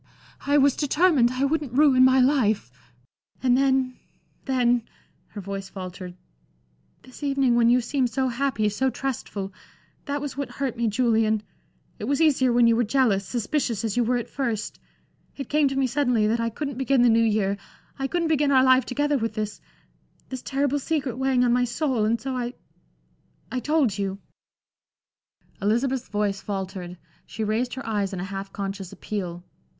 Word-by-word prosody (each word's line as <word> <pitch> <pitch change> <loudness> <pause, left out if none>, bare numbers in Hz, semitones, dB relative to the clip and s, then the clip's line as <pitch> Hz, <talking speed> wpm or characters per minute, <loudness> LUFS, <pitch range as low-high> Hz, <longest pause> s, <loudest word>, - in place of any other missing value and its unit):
I 285 +1 +4
was 280 -1 +4
determined 295 -4 +3
I 260 +2 0
wouldn't 290 -3 -1
ruin 270 -2 +5
my 260 0 +5
life. 240 - +2 0.7
And 250 -1 +4
then 265 -1 +1 0.5
then" 245 -3 +2 0.5
her 205 - -8
voice 195 0 -6
faltered 185 -1 -8 0.9
"this 255 - -14
evening 275 -3 +2
when 235 -1 +4
you 250 +1 +4
seemed 255 +1 0
so 260 +2 0
happy, 245 -3 0
so 260 +6 0
trustful 220 -7 -4 0.5
that 285 0 -2
was 285 -1 -5
what 280 0 -4
hurt 270 -4 -2
me, 235 -1 0
Julian 220 -2 +2 0.6
it - - -4
was 280 0 0
easier 275 -6 +3
when 240 0 +4
you 230 0 +5
were 240 - +2
jealous, 220 -5 +1
suspicious, 240 -2 -1
as 215 - -2
you 245 - +3
were 245 +2 +1
at 240 - -4
first 235 -6 -3 0.6
it 275 -3 -6
came 300 -1 +3
to 270 - -2
me 270 0 +2
suddenly 250 -4 +1
that 225 +2 +1
I 230 0 0
couldn't 275 +2 -5
begin 265 -1 +3
the - - +6
New 225 0 +4
Year 210 -3 +1 0.4
I 270 - -1
couldn't 345 +2 -1
begin 295 -2 +2
our 260 -1 +5
life 260 0 +5
together 290 +2 0
with 225 -1 -3
this 210 -2 -4 0.7
this 260 -2 -5
terrible 280 +1 0
secret 275 -4 -2
weighing 265 -2 +2
on 240 - +3
my 250 0 +3
soul. 245 -3 0
And 230 +2 +1
so 260 +3 -4
I 245 0 -3 1.0
I 255 - -1
told 270 -8 +1
you" 195 -1 -2 1.4
Elizabeth's 240 +5 0
voice 205 -1 -1
faltered, 190 -3 -5 0.3
she 220 - -4
raised 225 +4 -1
her 265 +1 -7
eyes 205 -4 -1
in 185 - -4
a - - -3
half 195 0 -6
conscious 195 -2 -5
appeal. 175 -4 -5
245 Hz, 175 wpm, -25 LUFS, 215-270 Hz, 1.4 s, the